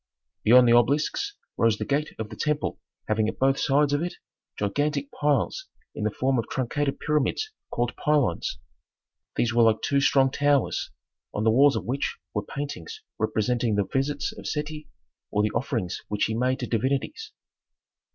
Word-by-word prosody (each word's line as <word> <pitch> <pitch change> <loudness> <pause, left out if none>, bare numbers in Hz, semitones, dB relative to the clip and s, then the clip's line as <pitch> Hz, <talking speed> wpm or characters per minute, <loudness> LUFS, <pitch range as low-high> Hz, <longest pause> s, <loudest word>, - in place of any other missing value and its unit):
Beyond 125 +2 +7
the 115 - +6
obelisks 150 - +2 0.2
rose 115 -2 +3
the - - -3
gate 145 +2 -1
of 110 -1 -5
the - - -7
temple 150 +5 -1 0.3
having 110 0 +1
at - - -6
both 135 +1 +2
sides 145 +1 +3
of 145 - +1
it 175 +1 -3 0.4
gigantic 140 +7 -1
piles 150 - 0 0.3
in 105 - -3
the - - +3
form 130 +4 0
of 115 - -4
truncated 135 +2 -1
pyramids 150 - 0 0.2
called 120 0 -1
pylons. 145 - +1 0.8
These 120 0 +1
were 120 - +4
like 110 -1 +4
two 140 -1 +2
strong 135 -1 +4
towers, 145 -2 +1 0.5
on 105 - 0
the 110 - +4
walls 140 +4 +5
of - - -3
which 135 +3 -2 0.2
were 105 - 0
paintings 140 - -6 0.2
representing 110 +1 +1
the 100 - +2
visits 140 +5 -1
of - - -8
Seti, 150 0 -4 0.4
or 105 - +1
the 105 - +1
offerings 115 - -2
which 105 0 0
he 110 - -2
made 125 +3 +1
to - - -1
divinities. 135 - -1
135 Hz, 170 wpm, -26 LUFS, 110-145 Hz, 0.8 s, Beyond